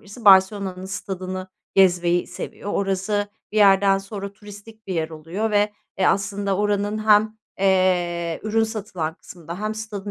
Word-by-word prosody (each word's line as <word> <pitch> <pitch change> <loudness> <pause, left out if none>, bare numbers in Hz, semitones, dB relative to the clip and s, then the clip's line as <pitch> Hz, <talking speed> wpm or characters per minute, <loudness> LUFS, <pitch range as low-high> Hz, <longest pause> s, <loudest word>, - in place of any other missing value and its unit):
birisi, 210 +3 -13
Barselona'nın 190 -1 +4
stadını 185 -1 -5 0.3
gezmeyi 175 -2 +3
seviyor. 205 - -7
Orası, 200 +1 -1 0.2
bir - - -4
yerden 195 -1 +5
sonra 200 0 -7
turistik 210 +1 -13
bir 190 - -3
yer 160 -1 -1
oluyor 165 +8 -3
ve, 210 0 +2 0.3
eee, 190 - +3
aslında 200 -1 0
oranın 205 +1 0
hem, 215 +1 +4 0.2
eee, 180 -3 +1
ürün 220 +1 +1
satılan 195 -8 -4
kısmında 170 +2 -10
hem 215 0 -2
stadın 210 -2 -6
195 Hz, 145 wpm, -23 LUFS, 185-210 Hz, 0.3 s, yerden